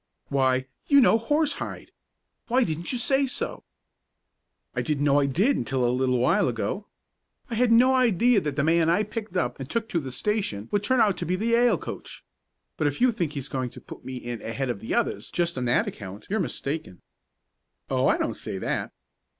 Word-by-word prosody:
"Why, 130 -1 +2 0.2
you 280 - +6
know 235 -3 +5
Horsehide! 295 +4 -1 0.6
Why 250 +2 +3
didn't 165 -3 -2
you 250 - -1
say 270 +3 +2
so?" - - -4 1.1
"I - - 0
didn't 150 -3 -1
know 145 0 +4
I 140 - +2
did 195 - +2
until 130 -2 0
a 120 - +1
little 125 0 +1
while 170 +12 +3
ago. 120 - -3 0.6
I - - -2
had 235 +1 +2
no 250 +3 +6
idea 240 -3 +4
that 150 -4 -3
the 140 - +1
man 165 +1 +3
I 175 +5 +3
picked 210 -3 -5
up 120 -7 -1
and 135 0 -6
took 230 -1 -1
to 170 - 0
the 135 -4 -6
station 130 - -2
would 205 0 +1
turn 255 +3 +2
out 205 -4 +3
to 175 - -3
be 180 - +1
the 220 +5 -1
Yale 235 +1 +4
coach. - - -8 0.5
But 155 - +1
if 145 - -2
you 255 0 +5
think 170 -8 -2
he's 140 -3 -5
going 130 -3 -3
to - - -12
put - - -12
me 130 +1 -6
in 120 -2 -6
ahead 125 +3 -2
of 115 - -6
the 110 - -3
others 235 -1 -1
just 170 -1 -1
on 125 -1 -2
that 120 - +2
account 100 0 -8
you're 220 - +1
mistaken." 150 - -4 0.8
"Oh, - - +1
I - - +3
don't - - -1
say - - -5
that." - - -2
170 Hz, 205 wpm, -26 LUFS, -, 1.1 s, you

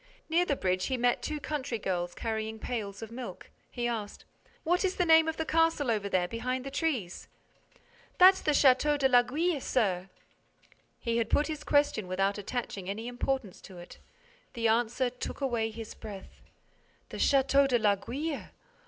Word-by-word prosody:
Near 340 +2 +3
the 285 - 0
bridge, 185 -5 0
he 260 - -1
met 245 0 +1
two 305 -1 -3
country 280 -4 -3
girls 175 -4 -3
carrying 220 -1 -3
pails 215 -3 -5
of 225 - -8
milk. 245 +1 -8 0.2
He 240 -1 -2
asked: 220 -4 -5 0.4
"What 355 +4 +1
is 380 -1 0
the 360 - +1
name 320 -1 +6
of 320 - -2
the 320 - -2
castle 325 -6 +2
over 205 -2 -1
there, 180 -2 +1
behind 250 +5 -3
the 275 - -5
trees?" 270 - -2 0.9
"That's 375 +1 +7
the - - -1
Château 285 +2 +4
de 275 -2 +3
l'Aiguille, 270 +6 +2
sir." 190 -8 0 0.9
He 230 -1 -1
had 230 - 0
put 295 - +3
his 305 -1 -5
question 285 -10 +2
without 195 +2 0
attaching 205 -3 -4
any 220 +4 -4
importance 245 -4 -3
to 185 - -12
it. 175 0 -12 0.5
The 230 -2 0
answer 240 +2 +1
took 250 - -6
away 240 -5 0
his 225 0 -8
breath: 205 -3 -10 0.7
"The - - -7
Château 275 0 +4
de 250 -2 +3
l'Aiguille? 240 +9 -1
245 Hz, 170 wpm, -29 LUFS, 215-285 Hz, 0.9 s, That's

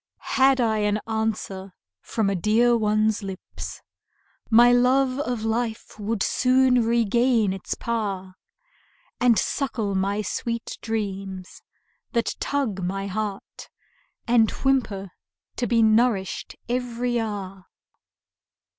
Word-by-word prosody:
Had 265 0 +4
I 220 -3 +2
an 210 0 +1
answer 215 -4 -3 0.3
from 220 -3 -1
a 200 - +1
dear 220 +6 +3
one's 215 -1 +1
lips, 195 -2 -8 0.7
My 240 +1 +7
love 255 +2 +3
of 245 -5 -2
life 225 -1 -3
would 210 0 -1
soon 255 -1 +3
regain 235 -2 +2
its 190 - -4
power; 200 -5 -3 0.9
And 245 -3 +4
suckle 230 -8 -1
my 200 +2 0
sweet 230 +3 -4
dreams, 195 -4 -4 0.5
that 235 -2 0
tug 255 -9 -1
my 195 +2 -2
heart, 200 0 -5 0.6
And 230 -2 +4
whimper 220 -9 -1 0.5
to 240 - -1
be 230 +1 +3
nourished 220 -3 +1
every 245 0 -1
hour. 195 -4 -5
220 Hz, 110 wpm, -24 LUFS, 200-240 Hz, 0.9 s, My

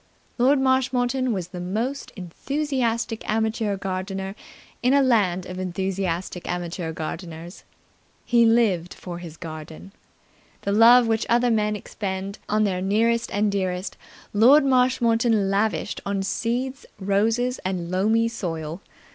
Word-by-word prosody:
Lord 265 +3 +4
Marshmoreton 260 -1 +1
was 185 -5 -3
the 180 -1 -7
most 225 +10 -3
enthusiastic 235 - -2
amateur 220 -1 0
gardener 190 0 -4 0.5
in 255 +2 +3
a 280 - +5
land 195 -8 +2
of 185 0 -7
enthusiastic 185 -1 -3
amateur 175 -1 -3
gardeners. 165 +2 -7 0.6
He 235 -1 +4
lived 220 -7 +2
for 175 -2 -7
his 165 -3 -9
garden. 160 +2 -9 0.7
The 200 - -2
love 235 +4 +7
which 225 -1 0
other 240 +1 +3
men 210 -1 +1
expend 195 -1 -5
on 215 +1 +2
their 185 -3 0
nearest 230 +4 +1
and 205 0 +1
dearest 185 -1 -2 0.4
Lord 265 +8 +6
Marshmoreton 235 -5 +2
lavished 210 +1 -1
on 200 -1 -2
seeds, 245 +6 -2
roses 220 +6 +1
and 180 -2 -3
loamy 220 +5 +2
soil. 165 -6 -5
205 Hz, 125 wpm, -24 LUFS, 185-235 Hz, 0.7 s, love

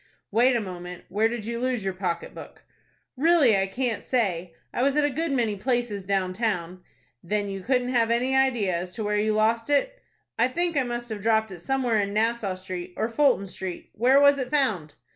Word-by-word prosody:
"Wait 245 +4 +4
a - - +2
moment. 180 -3 -7
Where 215 +4 +2
did 230 -2 -5
you 235 +1 -3
lose 250 -3 -1
your 190 -1 -2
pocket 180 -2 -3
book?" - - -11 0.5
"Really 290 -5 +4
I 195 0 +1
can't 235 0 -2
say. 180 -9 -1 0.2
I - - -1
was 275 +2 +2
at 300 -1 +3
a 290 - 0
good 320 +4 -2
many 235 -6 0
places 240 -2 -1
down 190 -1 -1
town." 185 -4 -2 0.4
"Then 205 +3 -2
you 195 -1 -5
couldn't 250 +3 0
give 230 -2 +3
any 250 +3 +1
idea 245 -9 +2
as 180 +1 -4
to 220 - -4
where 210 0 0
you 215 0 +1
lost 225 +3 +1
it?" - - +1 0.4
"I 235 - +5
think 340 +5 -1
I 280 - +3
must 240 -1 -4
have 215 -2 -5
dropped 220 0 +2
it 180 - -8
somewhere 250 0 0
in 200 0 -3
Nassau 220 -3 0
Street 185 -1 -7
or 220 - 0
Fulton 255 -4 +2
Street. 185 -2 -7
Where 255 +5 +4
was 285 0 +5
it 255 -1 -3
found?" 215 - 0
225 Hz, 210 wpm, -25 LUFS, 195-255 Hz, 0.5 s, I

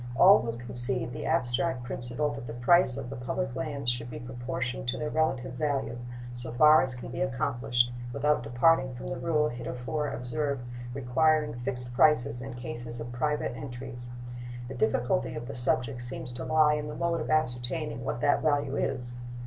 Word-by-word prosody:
All 195 +9 +8
will 115 -1 -3
concede 120 0 +3
the - - -4
abstract 125 0 +1
principle 125 +3 -1
that 135 -3 -7
the 115 - -6
price 130 +1 +4
of 125 - -6
the - - -5
public 125 +1 -3
lands 140 0 -4
should 120 0 -4
be - - -6
proportioned 125 +1 -4
to 120 - -1
their 150 0 -3
relative 130 -5 0
value, 135 -2 -1 0.3
so 120 -1 -2
far 150 +3 +7
as 130 -1 -2
can 125 - -8
be - - -4
accomplished 125 -2 +1 0.2
without 150 +3 +1
departing 130 +3 +3
from 120 - -6
the 135 - -4
rule 150 +1 +2
heretofore 125 +5 -3
observed 140 +1 -2 0.3
requiring 150 +4 +2
fixed 120 0 -3
prices 130 -3 +3
in 130 -1 -7
cases 120 -1 -6
of 115 +1 -6
private 150 +1 -1
entries. 125 -2 -7 0.6
The 130 - -6
difficulty 120 0 0
of 120 - -6
the 140 - -5
subject 125 +1 0
seems 125 0 -6
to 130 +2 -5
lie 155 -1 +4
in 150 0 -2
the 150 - -6
mode 170 -1 0
of - - -4
ascertaining 125 -3 0
what 120 - -3
that 145 -1 +3
value 145 -2 +1
is. 125 -2 -2
125 Hz, 180 wpm, -29 LUFS, 120-145 Hz, 0.6 s, All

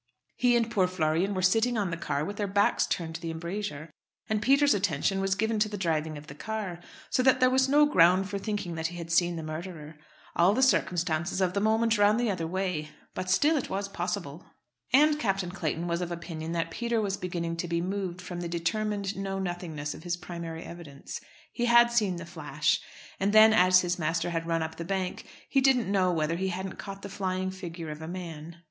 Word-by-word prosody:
He 245 -1 +3
and 230 -1 0
poor 190 -4 +3
Florian 180 +2 0
were 185 - -1
sitting 225 +6 +3
on 200 -4 0
the - - -1
car 150 -3 -2
with 205 +1 -6
their 205 - -1
backs 200 +1 +2
turned 165 -2 -2
to 170 - -6
the 165 - -4
embrasure; 165 -2 -5 0.4
and 215 -2 0
Peter's 280 +5 +4
attention 195 -1 0
was 195 0 +1
given 220 +1 0
to 210 0 +2
the 205 - -5
driving 160 -4 -1
of 145 - -10
the 140 - -10
car, 200 +1 -5 0.3
so - - +3
that 260 0 +4
there 255 0 +4
was 260 0 +3
no 295 +2 +6
ground 185 - +4
for 200 0 -3
thinking 205 -4 -3
that 160 0 -2
he 175 +1 -8
had 170 -1 -6
seen 175 +1 +3
the 165 - -5
murderer. 155 -1 -7 0.4
All 180 +4 +4
the 260 - +3
circumstances 175 -7 +1
of 185 -1 +1
the 200 - +1
moment 220 +1 +2
ran 205 +1 +5
the 240 -3 +1
other 165 -4 -3
way. 180 -4 -2 0.2
But 185 - -4
still 295 +12 +4
it 265 - -3
was 200 +1 -2
possible." 175 -4 -4 0.5
And 300 +3 +5
Captain 195 -7 -1
Clayton 165 -2 -2
was 170 +1 -1
of 175 -1 -3
opinion 165 -1 -5
that 165 -1 -1
Peter 235 +4 -1
was 200 -2 -1
beginning 170 -3 -3
to 175 - -3
be 170 0 0
moved 185 0 -3
from 175 -1 -6
the 170 - -4
determined 200 +3 -1
know 195 0 -3
nothingness 175 -6 -4
of - - -11
his 175 0 -2
primary 170 -2 -7
evidence. 155 -5 -9 0.3
He 240 - -1
had 235 0 +6
seen 210 -6 +2
the 170 -1 -7
flash. 150 -3 -1 0.4
And 200 +2 +1
then, 220 0 +8
as 185 -3 +6
his 180 0 -2
master 165 +2 0
had 165 0 -2
run 165 -1 +1
up 160 0 -6
the 170 - -4
bank, 190 +1 -3 0.2
he 270 - +2
didn't 255 -6 +3
know 185 -2 +3
whether 165 0 0
he 190 +1 -1
hadn't 190 +1 -4
caught 195 -1 -7
the - - -4
flying 185 -1 -2
figure 170 -4 -7
of 150 +1 -8
a 160 - -6
man. 170 -2 -7
185 Hz, 220 wpm, -28 LUFS, 165-205 Hz, 0.5 s, then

